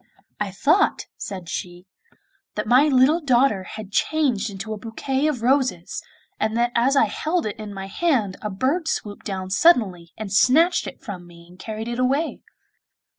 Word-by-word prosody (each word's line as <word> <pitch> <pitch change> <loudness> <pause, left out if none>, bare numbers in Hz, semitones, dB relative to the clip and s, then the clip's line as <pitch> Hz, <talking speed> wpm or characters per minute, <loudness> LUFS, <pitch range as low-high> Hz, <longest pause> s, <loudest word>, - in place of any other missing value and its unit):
'I 210 -1 -1
thought,' 310 - +2
said 185 -4 -7
she, 175 0 -6 0.7
'that 210 - -2
my 255 +6 +5
little 280 +4 +4
daughter 255 -7 +3
had 215 -1 -8
changed 250 -5 +1
into 200 +2 -6
a - - -5
bouquet 265 +6 -2
of 260 -7 -2
roses, 255 -9 +1 0.4
and 220 +1 0
that 240 0 +2
as 245 +4 +2
I 275 - +5
held 315 - -1
it 210 -1 -4
in 210 -1 -6
my 195 -1 -6
hand 215 - 0
a 210 - -3
bird 270 - -1
swooped 205 -9 -3
down 190 -2 -4
suddenly 190 - +3
and 210 -3 -5
snatched 285 - +4
it - - -10
from 185 -8 -7
me 170 0 -15
and 180 +1 -18
carried 220 +2 -5
it 240 +1 -3
away. 275 +6 0
225 Hz, 175 wpm, -23 LUFS, 195-275 Hz, 0.7 s, my